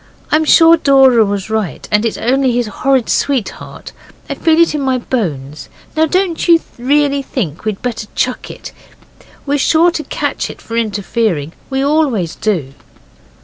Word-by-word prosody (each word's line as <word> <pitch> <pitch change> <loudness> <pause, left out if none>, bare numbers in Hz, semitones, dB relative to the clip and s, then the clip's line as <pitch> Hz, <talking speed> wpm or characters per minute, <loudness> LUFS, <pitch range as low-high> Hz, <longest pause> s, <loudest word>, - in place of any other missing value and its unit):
I'm 315 +1 +3
sure 330 +2 +6
Dora 270 -6 +5
was 200 0 -3
right, 220 -6 -3
and 210 +2 +2
it's 225 - -4
only 260 +2 +1
his 240 0 0
horrid 260 +4 0
sweetheart. 270 -7 -2 0.4
I - - -3
feel 320 0 +2
it 335 -2 +4
in 300 - -2
my 260 -1 +1
bones. 155 - -4 0.3
Now, 315 +1 +3
don't 365 0 -1
you 335 -1 +6 0.2
really 280 +2 +1
think 200 - -5
we'd 215 -3 -3
better 225 -3 -4
chuck 255 0 -2
it; - - -9 0.7
we're 285 0 0
sure 330 +5 +3
to 315 -2 -4
catch - - -3
it - - -10
for 230 - -8
interfering. 205 -7 -1 0.2
We 270 0 -1
always 280 - +1
do. 170 -11 -2
255 Hz, 160 wpm, -15 LUFS, 210-290 Hz, 0.7 s, sure